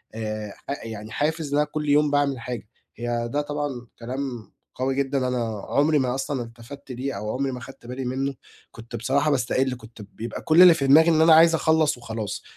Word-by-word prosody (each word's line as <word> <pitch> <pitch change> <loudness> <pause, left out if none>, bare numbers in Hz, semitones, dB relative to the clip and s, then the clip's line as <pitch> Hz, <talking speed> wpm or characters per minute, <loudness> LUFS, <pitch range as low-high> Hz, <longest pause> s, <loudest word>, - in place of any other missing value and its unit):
آآ، 110 -2 -4 0.2
ح 140 - -4
يعني 110 -1 -7
حافز 155 +2 -1
إن - - +3
أنا 150 - +2
كل 150 -1 -2
يوم 150 0 +4
باعمل 145 -2 +1
حاجة. 120 -2 -6 0.3
هي 120 0 -2
ده 145 - +1
طبعًا 145 -4 -4
كلام 125 -1 -5 0.2
قوي 130 +1 -1
جدًا، 135 -1 0
أنا 115 -5 -2
عمري 150 +1 +3
ما 125 -1 0
أصلًا 135 -1 -2
التفَّت 120 +4 -11
ليه، 130 +2 -3
أو 105 +2 -4
عمري 135 +1 -1
ما 125 - -6
خدت 135 -1 -12
بالي 125 +2 -5
منه. 135 +2 -2 0.4
كنت 115 0 -10
بصراحة 140 +6 +1
باستقِل، 130 0 +1
كنت 110 -1 -13
بيبقى 110 +3 -7
كل 160 +2 +5
اللي 180 -2 +10
في 140 -4 -1
دماغي 160 +5 +7
إن 160 -1 +4
أنا 160 0 +7
عايِز 165 +1 +7
أخلَص 160 -3 +2
وخلاص. 110 -4 -5
130 Hz, 200 wpm, -24 LUFS, 120-145 Hz, 0.4 s, اللي